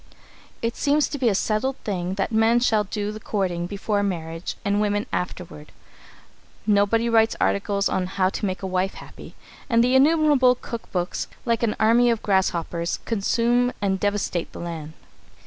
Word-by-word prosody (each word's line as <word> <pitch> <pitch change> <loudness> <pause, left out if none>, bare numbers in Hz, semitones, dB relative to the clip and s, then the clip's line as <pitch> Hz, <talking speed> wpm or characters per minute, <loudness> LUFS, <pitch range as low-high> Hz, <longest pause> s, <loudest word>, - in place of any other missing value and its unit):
It 230 0 -1
seems 290 +1 +2
to 290 - -5
be 245 -3 +3
a 200 - +1
settled 225 +7 0
thing 185 -2 -2
that 195 +2 -2
men 225 +2 +4
shall 220 -3 +2
do 205 +1 -3
the 215 - -8
courting 180 -5 -2
before 205 +1 -1
marriage 165 -3 -3
and 205 +1 +1
women 205 0 0
afterward. 175 -4 -5 0.9
Nobody 210 +2 +2
writes 225 -1 +3
articles 200 0 +1
on 185 -1 -1
"How 185 0 +1
to 205 - -3
Make 185 0 -4
a - - -1
Wife 185 +1 -1
Happy," - - -12 0.3
and 230 -1 +4
the 250 +1 +2
innumerable 285 -2 +5
cook 235 -2 -8
books, 180 0 -2 0.2
like 230 -2 +1
an 230 -3 0
army 235 +2 +4
of 230 -2 0
grasshoppers, 175 -3 0
consume 235 +3 +1
and 195 -2 0
devastate 205 -4 -1
the - - -8
land. 160 -3 -6
205 Hz, 165 wpm, -23 LUFS, 185-230 Hz, 0.9 s, innumerable